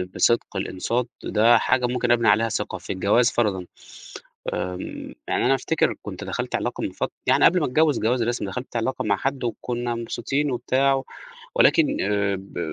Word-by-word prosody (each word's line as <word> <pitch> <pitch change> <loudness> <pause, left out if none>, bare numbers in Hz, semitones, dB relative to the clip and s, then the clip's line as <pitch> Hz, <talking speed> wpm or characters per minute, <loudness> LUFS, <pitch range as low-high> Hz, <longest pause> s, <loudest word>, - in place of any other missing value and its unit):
بصِدق 120 - +2
الإنصات، 115 +6 -2 0.2
ده 115 +2 +4
حاجة 125 +2 +1
ممكن 120 0 0
أبني 120 -1 +3
عليها 110 +2 +4
ثقة، 105 -3 -3
في 90 - -5
الجواز 105 +6 +3
فَرَضًا، 100 -6 0 0.9
آمم، 90 0 -5
يعني - - +1
أنا 135 - +4
أفتكر 150 +4 0
كنت - - -7
دَخَلت - - -4
علاقة - - -3
من - - -2
فت - - -3 0.2
يعني - - +4
قبل 180 +1 +5
ما 150 - +1
أتجوّز 150 +1 +2
جواز 120 +2 +1
رسمي، 120 -3 -1
دَخَلت 125 +5 -6
علاقة 115 +3 -1
مع 100 -2 +2
حد 135 +3 -2
وكنا 120 0 -3
مبسوطين 135 +5 -2
وبتاع، 135 +2 +1 0.5
ولكن 310 - +4
آآ 100 -1 0
ب 95 -1 -10
120 Hz, 170 wpm, -24 LUFS, 105-130 Hz, 0.9 s, قبل